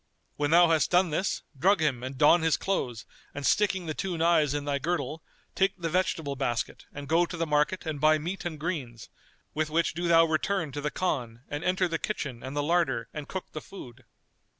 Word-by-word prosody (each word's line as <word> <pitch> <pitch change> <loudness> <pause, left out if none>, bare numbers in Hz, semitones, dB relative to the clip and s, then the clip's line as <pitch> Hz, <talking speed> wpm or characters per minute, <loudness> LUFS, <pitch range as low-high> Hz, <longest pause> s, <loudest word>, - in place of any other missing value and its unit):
When 145 0 0
thou 170 +1 +6
hast 160 -2 +3
done 180 -1 +3
this 185 +6 -1
drug 185 +7 +3
him 145 -6 0
and 130 +1 -6
don 150 +5 +6
his 160 -1 +2
clothes 125 - -2 0.3
and 145 -1 -4
sticking 190 -1 +2
the 155 - -3
two 180 +1 -3
knives 160 -3 +3
in 145 -1 -3
thy 140 -1 -1
girdle, 165 0 -2 0.3
take 195 0 +1
the 165 -3 -3
vegetable 160 -5 0
basket 120 -3 -3
and 145 0 -8
go 170 +3 +3
to 175 - -6
the 165 - 0
market 150 +4 +1
and 155 -3 -4
buy 155 0 +5
meat 175 +5 -5
and 160 -3 -5
greens, 145 -9 -4 0.4
with 155 0 -1
which 165 +2 +1
do 175 +2 -2
thou 165 -1 +6
return 160 0 -1
to 145 - -5
the 150 - -1
Khan 125 -11 -3
and 145 +2 -4
enter 185 0 +1
the 165 -2 -2
kitchen 140 - -4
and 135 +2 -6
the 145 - +1
larder 145 -8 +1
and 150 -2 -6
cook 190 - -6
the 155 - -6
food. 130 -12 -12
155 Hz, 215 wpm, -28 LUFS, 145-175 Hz, 0.4 s, thou